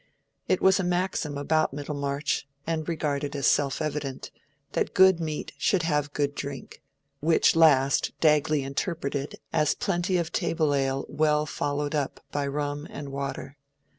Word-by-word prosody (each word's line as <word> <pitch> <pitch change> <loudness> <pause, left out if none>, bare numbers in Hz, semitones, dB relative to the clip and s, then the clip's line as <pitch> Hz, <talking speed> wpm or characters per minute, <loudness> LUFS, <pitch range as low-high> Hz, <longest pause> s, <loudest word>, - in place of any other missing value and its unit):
It 185 - +1
was 190 +1 +5
a - - 0
maxim 175 -4 -1
about 155 0 +1
Middlemarch, 140 -1 -2 0.2
and 160 0 -2
regarded 145 -3 -2
as 140 -2 -1
self 140 +4 +2
evident, 145 -3 -4 0.4
that - - -1
good 190 -2 +6
meat 155 -2 -4
should 185 -4 +2
have 150 -3 0
good 145 -1 -1
drink, 140 -1 -7 0.4
which 160 +2 +3
last 140 -4 +4
Dagley 150 -2 +3
interpreted 140 0 -3 0.2
as 155 -2 +2
plenty 185 -4 0
of 170 -1 -2
table 165 -4 +1
ale 135 -1 0
well 150 0 +1
followed 145 0 -2
up 145 -3 -2
by 145 -1 -1
rum 145 +1 -3
and 145 -1 -7
water. 140 0 -5
150 Hz, 145 wpm, -27 LUFS, 140-160 Hz, 0.4 s, good